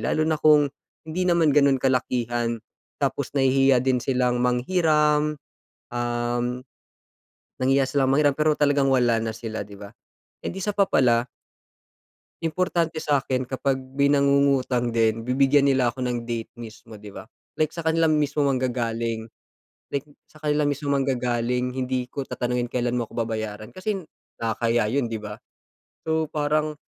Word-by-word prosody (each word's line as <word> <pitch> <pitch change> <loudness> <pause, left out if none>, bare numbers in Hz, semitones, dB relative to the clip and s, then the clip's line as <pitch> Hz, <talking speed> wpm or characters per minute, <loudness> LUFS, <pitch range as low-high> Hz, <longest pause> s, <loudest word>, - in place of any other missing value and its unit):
lalo 155 - 0
na 155 -1 0
kung 150 -1 +6 0.4
hindi 160 +3 -3
naman 170 -3 +4
ganun 140 -2 +4
kalakihan. 120 -2 0 0.5
Tapos - - -1
nahihiya 135 -1 +4
din 130 -1 +2
silang 125 -1 0
manghiram, 150 +3 +2 0.6
um, 120 0 -1 1.2
nahihiya 135 +1 +3
silang 135 -1 +1
manghiram, 145 +1 +3
pero 155 +1 +2
talagang 145 -1 +2
wala 120 -3 +3
na 115 - -2
sila, 110 -2 -5
di 100 - -11
ba? 100 0 -10 0.5
And - - -3
isa 195 +2 -3
pa 200 - +5
pala 120 -6 +2 1.1
importante 165 0 -1
sa'kin 135 -3 0
kapag 135 +1 -1 0.2
may 140 +1 +2
nangungutang 140 -3 +2
din, 115 +1 +1
bibigyan 135 +2 +4
nila 130 -3 +2
ako 130 - -9
ng 120 -1 -3
date 115 -1 -4
mismo, 115 -1 -11
di 105 -1 -11
ba? 110 - -10 0.3
Like 155 - +3
sa 165 +2 -7
kanila 160 0 +2
mismo 150 -1 +1
manggagaling. 115 -3 -2 0.6
Like 140 +1 -3 0.2
sa 155 - -17
kanila 150 0 +1
mismo 145 0 -2
manggagaling, 125 -1 -1
hindi 130 -1 -2
ko 140 +2 -5
tatanungin 125 -1 -2
kailan 120 0 -1
mo 120 - 0
ako 115 - -7
babayaran 110 -1 -4
kasi 190 -3 -3 0.3
nakakahiya 115 +1 0
yun, 120 -5 0
di 110 - -3
ba? 105 -1 -7 0.7
So, 160 0 0
parang 150 +1 0
130 Hz, 145 wpm, -24 LUFS, 120-150 Hz, 1.2 s, kung